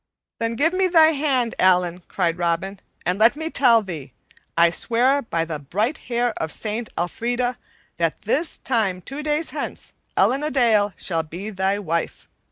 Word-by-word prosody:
"Then 230 0 -1
give 315 +8 +2
me 375 0 +2
thy 325 -3 +6
hand, 275 -6 0
Allan," 180 -1 +3
cried 175 -2 -1
Robin, 175 +3 -1 0.3
"and 180 +3 0
let 230 +5 +5
me 320 +2 -4
tell 235 -4 +5
thee, 150 -9 -7 0.4
I 170 0 +5
swear 250 +9 +2
by 165 -10 -2
the 160 -2 -5
bright 205 - -2
hair 240 -1 +1
of 160 - -2
Saint 220 +5 -3
AElfrida 240 +8 -1 0.4
that 165 +2 -1
this 285 +10 +1
time 195 -8 -1
two 275 +3 -6
days 300 +1 -1
hence - - -5 0.2
Ellen 270 +2 +3
a 300 - -1
Dale 220 -7 +3
shall 165 -3 -1
be 175 +7 -7
thy 190 0 0
wife. 170 -4 -3
220 Hz, 170 wpm, -22 LUFS, 175-260 Hz, 0.4 s, thy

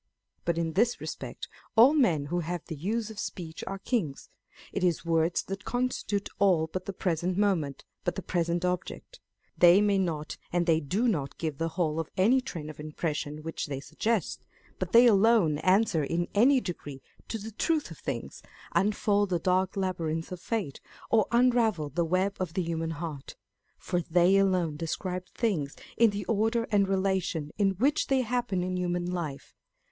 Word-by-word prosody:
But 170 -1 0
in 165 -1 -1
this 230 +6 +2
respect - - -6 0.3
all 240 +6 +8
men 180 - +3
who 175 +4 -1
have 175 0 -4
the 160 - -6
use 215 +8 -2
of 215 - -9
speech 165 -4 -6
are 195 - -3
kings. 195 - -2 0.4
It 200 - -2
is 175 -2 +1
words 165 +1 +1
that 195 +1 -6
constitute 245 -5 -1
all 185 -5 +4
but 185 +3 -5
the - - -3
present 180 -1 -1
moment, 180 -9 0 0.2
but 175 - -1
the 195 - -5
present 170 0 0
object. 180 - -4 0.4
They 175 +2 +8
may 205 -1 +3
not 160 -5 -2
and 175 0 +1
they 165 -2 +3
do 190 - 0
not 150 -11 -1
give 155 -4 -3
the 165 - 0
whole 160 -3 +1
of 165 - -3
any 235 +8 +4
train 165 - -6
of 155 -1 -9
impression 150 -1 -4
which 165 0 -4
they 140 -2 -4
suggest; 215 +6 -2 0.4
but 185 -1 -3
they 235 +1 +8
alone 205 -8 +4
answer 185 -3 +3
in 170 +4 -1
any 255 +6 +5
degree 145 - -7 0.2
to 225 - -3
the 220 +1 -7
truth 305 +8 0
of - - -10
things, - - -5 0.3
unfold 205 0 +2
the 180 - +1
dark 185 +3 +1
labyrinth 165 -4 -2
of 180 -1 -6
fate, 200 - -3 0.3
or 220 -3 +4
unravel 235 -10 +3
the 170 +5 0
web 185 +4 0
of 180 -2 -3
the 185 - +1
human 165 -1 -2
heart; 160 -3 -6 0.4
for 180 -1 -2
they 175 +3 +4
alone 180 -6 +2
describe 180 +3 -3
things 175 - -1 0.2
in 230 -1 +5
the 200 0 -4
order 225 +2 +1
and 200 -2 +3
relation 190 -5 0
in 195 -1 +3
which 275 - +1
they 270 -1 +3
happen 235 -6 -1
in 185 0 -2
human 175 -1 -1
life. 170 -6 -4
180 Hz, 180 wpm, -28 LUFS, 165-205 Hz, 0.4 s, all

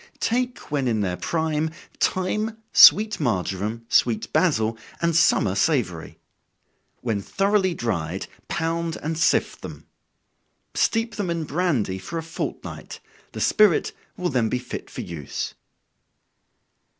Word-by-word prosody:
Take 245 - -2
when 140 -3 0
in 110 -3 +1
their 90 -3 -1
prime, 160 - -1 0.3
thyme, 215 +4 0 0.2
sweet 215 +1 +8
marjoram, 110 - -2
sweet 115 -2 +1
basil, 115 -11 +2 0.2
and 170 -1 +1
summer 105 - +4
savory. 100 - 0 0.8
When 110 -5 -1
thoroughly 195 - +1
dried, 95 -6 -2 0.2
pound 165 0 -2
and 160 +2 -2
sift 160 - +1
them. - - -9 0.9
Steep 225 -1 0
them 200 -4 -2
in 170 -1 -1
brandy 145 - 0
for 165 - -6
a 165 - -3
fortnight, 165 +1 -6 0.3
the - - -5
spirit 210 -6 +4 0.3
will 180 -1 -1
then 120 -5 +1
be 125 - 0
fit 125 - -7
for - - -6
use. 80 -5 -5
155 Hz, 125 wpm, -24 LUFS, 110-180 Hz, 0.9 s, sweet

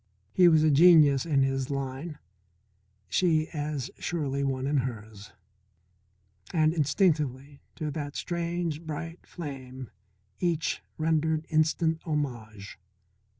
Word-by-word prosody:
He 180 - +6
was 160 -2 +5
a 155 - +4
genius 150 -2 +6
in 140 -4 +3
his 135 -1 -1
line, 140 +3 -4 0.9
she 155 - +2
as 145 -4 -4
surely 140 -5 -2
one 135 -1 -1
in 145 +1 +1
hers. 110 -5 -5 1.2
And, 155 -1 +3
instinctively, 145 -4 0
to 150 -1 -3
that 145 -1 -5
strange, 170 -2 -2
bright 165 +1 -7
flame 130 -6 -8 0.5
each 170 -3 -1 0.2
rendered 160 0 +1
instant 160 +1 +1
homage. 115 - -4
150 Hz, 105 wpm, -28 LUFS, 135-160 Hz, 1.2 s, He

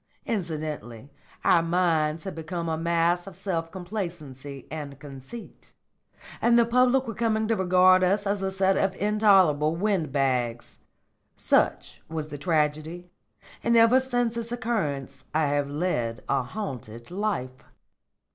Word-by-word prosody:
Incidentally 155 - -4 0.3
our 170 - +5
minds 165 -2 +1
had 190 - -5
become 165 +1 -5
a 160 - 0
mass 170 +2 +1
of 195 - -9
self 165 -4 -3
complacency 170 - -6
and 145 -3 -6
conceit, 140 - -11 0.7
and 235 0 +4
the 235 - +5
public 250 +2 +3
were 230 - -4
coming 220 0 0
to 225 - +2
regard 185 -1 +5
us 200 +3 +2
as 200 0 -1
a 190 - 0
set 190 0 +2
of 190 -1 +1
intolerable 190 -8 +4
wind 185 -5 0
bags. 125 -4 -1 0.6
Such - - +1
was 155 -1 -4
the 145 - -7
tragedy, 160 +2 -1 0.5
and 235 0 +3
ever 230 +3 +6
since 245 -3 0
its 230 0 -5
occurrence 215 - -3
I 155 -1 +3
have 145 -1 0
led 135 -7 -2
a - - +1
haunted 125 - -7
life." 180 -11 -3
175 Hz, 135 wpm, -26 LUFS, 150-205 Hz, 0.7 s, ever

